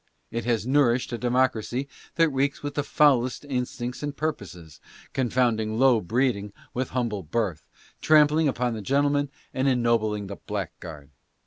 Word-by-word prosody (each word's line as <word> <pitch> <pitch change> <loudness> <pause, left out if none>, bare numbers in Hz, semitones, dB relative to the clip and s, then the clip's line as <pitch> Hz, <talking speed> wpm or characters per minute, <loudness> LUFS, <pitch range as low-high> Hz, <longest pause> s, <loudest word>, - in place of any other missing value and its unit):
It 115 0 -3
has 115 -2 0
nourished 130 -3 +2
a 120 - -3
democ 125 +1 +2
racy 120 +5 -4 0.3
that 165 -1 +4
reeks 140 +1 -1
with 145 0 -3
the 145 - 0
foulest 140 -3 +2
instincts 125 -2 -3
and 145 -1 -4
purposes, 90 - -5 0.3
con 130 -2 0
founding 110 -3 +1
low 125 -3 +4
breeding 105 -1 0 0.2
with 130 0 -2
humble 115 -5 -2
birth, 90 -2 -3 0.3
trampling 155 0 +5
upon 125 -3 0
the 110 - -5
gentleman 145 +4 +1 0.2
and 130 +1 0
ennobling 115 -5 +1
the 100 0 -7
blackguard. 85 -8 -7
125 Hz, 150 wpm, -25 LUFS, 110-140 Hz, 0.3 s, trampling